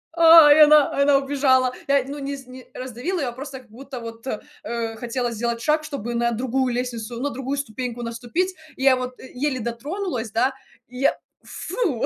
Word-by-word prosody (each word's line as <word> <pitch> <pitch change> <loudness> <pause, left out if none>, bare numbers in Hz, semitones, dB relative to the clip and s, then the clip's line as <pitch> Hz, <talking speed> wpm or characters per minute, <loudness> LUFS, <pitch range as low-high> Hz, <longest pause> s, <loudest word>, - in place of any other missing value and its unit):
а, 325 -3 +9
и - - +3
она 300 -1 +7
и - - +3
она 280 -1 +5
убежала. 265 -2 +2
Я, 280 -2 +3
ну, 285 +1 -6
не 280 0 -4
з 265 - -12
не 255 0 -11
раздавила 260 +9 -4
ее, 275 - -1
а - - -2
просто 265 0 -8
как 240 - -24
будто 260 +1 -9
вот, 230 +1 -9 0.4
э, 230 -1 -3
хотела 240 +1 -2
сделать 235 +1 -2
шаг, 305 0 +1
чтобы 260 -6 -5
на 235 0 +1
другую 255 +2 0
лестницу, 240 -2 -4
на 285 +2 -1
другую 270 +3 -3
ступеньку 245 -2 -4
наступить. 245 +11 -2 0.2
Я 265 0 +5
вот, 255 0 -5
э, 260 - -11
еле 260 0 -1
дотронулась, 235 - -4
да, 260 +4 +1 0.3
и 250 +1 -10
я, 275 - +2 0.3
фу, 335 - -2
260 Hz, 195 wpm, -23 LUFS, 235-280 Hz, 0.4 s, а